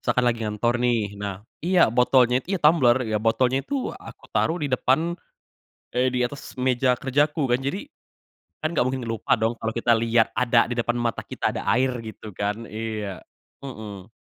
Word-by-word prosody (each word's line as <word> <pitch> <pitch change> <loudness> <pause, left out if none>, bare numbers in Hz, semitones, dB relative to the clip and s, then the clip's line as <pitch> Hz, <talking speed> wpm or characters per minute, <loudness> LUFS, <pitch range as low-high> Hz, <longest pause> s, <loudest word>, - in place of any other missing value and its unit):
Misalkan 125 - +1
lagi 115 -1 -1
ngantor 110 +3 0
nih 120 -1 +3 0.2
nah 100 -1 -3 0.3
iya 180 0 +3
botolnya 125 0 +4
itu 150 - -27
ya - - -9
tumbler, 150 -6 +5
ya 110 - +1
botolnya 125 +3 +2
itu - - -4 0.3
aku - - -12
taruh 165 - +2
di 145 - 0
depan 130 +3 +2 0.9
eh 125 +2 +2
di 125 - 0
atas 135 +2 -8
meja 130 0 +2
kerjaku. 145 +3 +1
Kan 120 - +3
jadi, 140 +7 -1 0.8
kan 155 - 0
nggak 135 - +2
mungkin 130 0 -2
lupa 115 -1 -5
dong 110 +1 +1
kalo 110 - -2
kita 115 +1 +2
lihat 115 0 +3
ada 120 -2 +3
di - - -1
depan 120 +1 0
mata 115 -2 -1
kita - - -1
ada - - -3
air 130 +2 +2 0.2
gitu 110 - -9
kan, 105 +3 -2
iya. 110 -3 -5 0.4
Heeh. 105 -6 -8
120 Hz, 180 wpm, -24 LUFS, 115-130 Hz, 0.9 s, tumbler